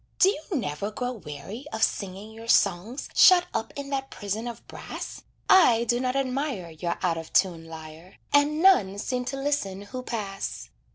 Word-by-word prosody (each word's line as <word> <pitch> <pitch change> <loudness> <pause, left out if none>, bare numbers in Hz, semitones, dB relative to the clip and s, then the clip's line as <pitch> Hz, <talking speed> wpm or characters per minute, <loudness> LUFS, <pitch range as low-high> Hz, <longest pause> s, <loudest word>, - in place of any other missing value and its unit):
Do 385 - +6
you 315 -6 -3
never 200 - -3
grow 245 +3 -3
weary 195 - -8
of 220 - -1
singing 200 +2 -2
your 225 +1 -11
songs 205 +5 +2
Shut 360 -2 +7
up 225 - -2
in 280 0 -6
that 270 -1 -2
prison 210 +3 -4
of 235 -1 -8
brass? - - -7 0.3
I 245 -12 +6
do 240 +1 +1
not 255 0 -1
admire 265 - -2
Your 170 +2 -3
out 170 -2 +1
of 165 - -9
tune 170 -4 +2
lyre, 160 +2 -11 0.2
And 295 +3 +3
none 205 - +5
seem 250 +4 -2
to 270 - -3
listen 270 -9 -1
who 255 +5 -6
pass. 205 -5 -5
225 Hz, 175 wpm, -26 LUFS, 190-270 Hz, 0.3 s, Shut